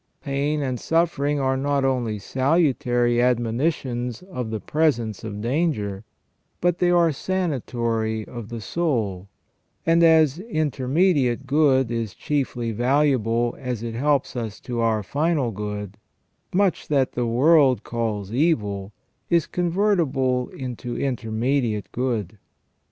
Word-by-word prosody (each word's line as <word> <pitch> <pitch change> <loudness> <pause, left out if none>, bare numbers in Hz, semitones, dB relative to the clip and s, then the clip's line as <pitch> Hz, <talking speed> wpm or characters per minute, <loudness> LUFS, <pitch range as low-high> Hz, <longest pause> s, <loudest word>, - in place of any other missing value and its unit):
Pain 145 +1 -1
and 130 -3 -2
suffering 150 -3 +1
are 130 -1 +1
not 140 0 0
only 120 -5 0
salutary 130 - +1
admonitions 125 +1 0
of 125 -12 -5
the 110 -1 -3
presence 120 -8 0
of 105 -2 -5
danger, 115 - -1 0.6
but 175 -1 +1
they 180 - +3
are 170 -2 +4
sanatory 120 - -2
of 120 -3 -8
the 115 -2 -6
soul, 105 - -1 0.6
and 165 +1 +4
as 160 -2 +5
intermediate 145 - +1
good 135 -3 +3
is 115 -3 -3
chiefly 130 -5 -2
valuable 120 -1 +1
as 125 -4 -4
it 115 -1 -4
helps 140 +3 0
us 110 -3 -4
to 120 -2 -4
our 110 -2 +1
final 145 - 0
good, 105 -1 -5 0.5
much 195 -1 +1
that 135 -3 +2
the 120 -1 -1
world 135 +2 +4
calls 110 -4 -3
evil 105 - 0 0.4
is 170 -3 +3
con 175 -1 -2
vertible 140 -10 +1
into 125 -2 -5
intermediate 115 -4 -1
good. 110 -6 -2
125 Hz, 125 wpm, -23 LUFS, 115-150 Hz, 0.6 s, as